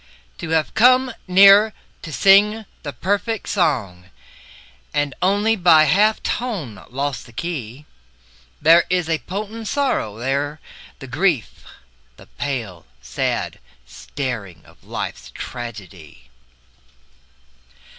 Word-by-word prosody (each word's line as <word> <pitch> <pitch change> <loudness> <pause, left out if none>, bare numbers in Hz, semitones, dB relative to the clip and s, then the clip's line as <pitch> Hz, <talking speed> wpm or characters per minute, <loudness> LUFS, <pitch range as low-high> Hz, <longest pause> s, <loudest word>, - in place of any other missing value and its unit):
To - - -6
have 160 -1 0
come 255 +3 +4
near 200 +3 +7 0.3
to 155 - -8
sing 210 +6 +4 0.2
the 145 - -5
perfect 205 +7 -2
song 95 - -1 0.9
And 145 -2 0
only 205 +4 +2
by 170 -5 +6
a 155 0 +3
half 215 +3 +2
tone 190 - -4
lost 135 0 -4
the - - -15
key, 140 -2 -6 0.7
There 165 +3 +5
is 180 -2 +1
the 160 -1 -1
potent 215 +3 -6
sorrow, 250 - -1
there 140 +5 -2 0.4
the 135 - -10
grief, 145 - -1 0.5
The - - -15
pale, 95 - -5
sad - - -3 0.3
staring 110 - -6
of - - -21
life's - - -6
tragedy. 100 - -9
155 Hz, 110 wpm, -20 LUFS, 120-200 Hz, 0.9 s, near